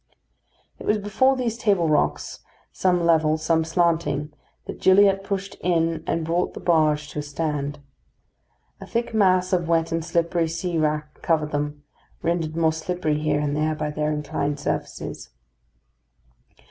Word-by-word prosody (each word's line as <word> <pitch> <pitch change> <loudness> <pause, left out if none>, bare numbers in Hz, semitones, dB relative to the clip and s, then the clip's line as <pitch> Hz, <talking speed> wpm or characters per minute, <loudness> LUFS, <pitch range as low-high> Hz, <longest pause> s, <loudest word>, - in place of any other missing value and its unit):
It - - -8
was 215 - +3
before 215 +6 +2
these 240 -3 -2
table 195 -7 +2
rocks, 75 - 0 0.3
some 180 -2 +1
level, 160 -2 +3
some 160 +1 +1
slanting, 165 -3 0 0.3
that - - -8
Gilliatt 195 +1 +5
pushed 195 0 -3
in 165 -2 +1
and 165 -1 -1
brought 170 +2 -1
the - - -6
barge 155 -3 +2
to - - -4
a - - -1
stand. 145 -1 -3 1.0
A - - -10
thick 235 0 -2
mass 185 -3 +3
of 175 -2 +1
wet 165 0 +1
and 165 0 -1
slippery 170 0 0
sea 165 +1 -2
wrack 150 -1 -2
covered 155 -2 +1
them, 145 0 -3 0.4
rendered 165 -2 -1
more 160 -1 +2
slippery 160 -2 -2
here 150 -1 +1
and 145 -1 -1
there 155 +1 0
by 150 0 -3
their 150 0 -1
inclined 145 -1 -2
surfaces. - - -4
165 Hz, 150 wpm, -24 LUFS, 150-180 Hz, 1.0 s, Gilliatt